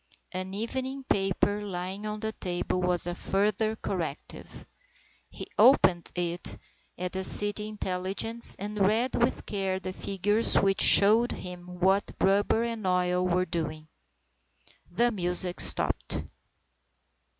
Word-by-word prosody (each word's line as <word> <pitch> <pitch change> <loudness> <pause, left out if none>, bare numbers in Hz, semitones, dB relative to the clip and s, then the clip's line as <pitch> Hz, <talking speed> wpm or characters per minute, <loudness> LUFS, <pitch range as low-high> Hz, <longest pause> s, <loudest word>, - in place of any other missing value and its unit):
An 185 0 -4
evening 260 +5 -3
paper 200 -2 0
lying 190 +1 -5
on 210 0 -5
the 220 0 -2
table 180 -2 -3
was 180 -1 0
a 175 - -3
further 210 +4 -1
corrective. 170 -9 -6 0.6
He - - -8
opened 180 -10 +4
it 175 0 -2 0.4
at 180 0 -4
the 190 0 -3
city 205 +2 +4
intelligence 205 +3 0
and 210 +2 -5
read 220 +6 +2
with 240 - 0
care 195 -2 -2
the 185 0 -6
figures 205 +4 +1
which 195 0 +2
showed 220 +4 +6
him 180 -1 -8
what 190 +2 +1
rubber 200 +4 +2
and 230 -4 -3
oil 180 0 +1
were 180 +1 +1
doing. 155 -3 -4 1.0
The 240 0 +1
music 180 -2 +1
stopped. - - 0
195 Hz, 125 wpm, -27 LUFS, 180-215 Hz, 1.0 s, showed